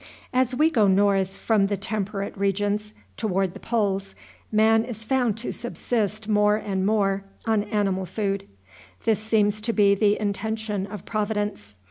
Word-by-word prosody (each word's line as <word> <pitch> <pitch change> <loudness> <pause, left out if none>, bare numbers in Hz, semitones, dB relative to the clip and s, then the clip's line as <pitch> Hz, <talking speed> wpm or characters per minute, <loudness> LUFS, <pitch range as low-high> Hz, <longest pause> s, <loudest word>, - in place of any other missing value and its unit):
As 255 0 +2
we 310 +4 +3
go 220 -9 +4
north, 195 0 +3
from 210 -3 +2
the 200 0 -1
temperate 200 -1 -3
regions 205 +2 -1 0.2
toward 195 -4 0
the 200 - -10
poles, 200 -4 -1 0.4
man 220 +1 +4
is 230 -2 -6
found 245 -3 +1
to 230 - -3
subsist 220 -3 -2
more 210 -1 +4
and 195 -3 -1
more 200 -2 +1 0.2
on 220 -2 +1
animal 195 -3 0
food. 195 +1 -2 0.6
This 220 -3 +3
seems 215 -1 +1
to 230 +2 -1
be 200 -2 +5
the 205 +1 +2
intention 210 -1 -2
of 205 -2 -8
Providence. 205 - -3
210 Hz, 150 wpm, -25 LUFS, 195-220 Hz, 0.6 s, be